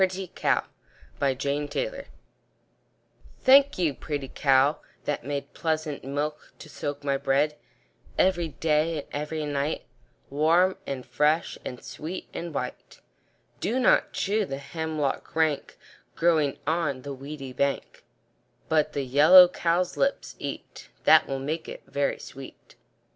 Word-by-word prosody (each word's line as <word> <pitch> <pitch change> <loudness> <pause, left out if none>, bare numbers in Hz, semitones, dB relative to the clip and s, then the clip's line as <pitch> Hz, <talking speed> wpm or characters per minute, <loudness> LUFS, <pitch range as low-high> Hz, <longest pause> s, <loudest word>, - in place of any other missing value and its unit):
ANONYMOUS 190 -1 +3 1.0
PRETTY 140 +2 0
COW - - -3 1.4
Thank 275 +1 +6
you, 165 -5 +1
pretty 145 -2 -5
cow, 135 +1 +3 0.3
that 145 - -2
made 140 +1 -4
Pleasant 155 -3 -2
milk 145 +3 -4
to - - -11
soak 145 -1 -5
my 140 -1 +1
bread, 140 +3 +1 0.6
Every 175 -3 +2
day 160 +1 0
and - - -26
every 150 +1 -3
night, 145 +1 -2 0.5
Warm, 165 +6 +3
and 130 -2 -4
fresh, 155 +3 +1
and 125 - -7
sweet, 165 +5 -6
and 170 0 -5
white 145 - -6 0.6
Do 235 +6 0
not 255 - +4
chew 210 +2 0
the 135 -8 -4
hemlock 155 0 -3
rank, 160 -3 0 0.4
Growing 160 -4 +2
on 150 -5 -1
the 140 - -5
weedy 135 -1 -8
bank; 140 +1 -2 0.6
But 155 -2 +2
the 140 -1 -2
yellow 155 +8 +8
cowslips 180 +10 0
eat, - - -7
That - - +6
will 135 - -2
make 150 +5 -4
it - - -9
very 140 0 -1
sweet. 135 0 -12
150 Hz, 125 wpm, -26 LUFS, 140-165 Hz, 1.4 s, yellow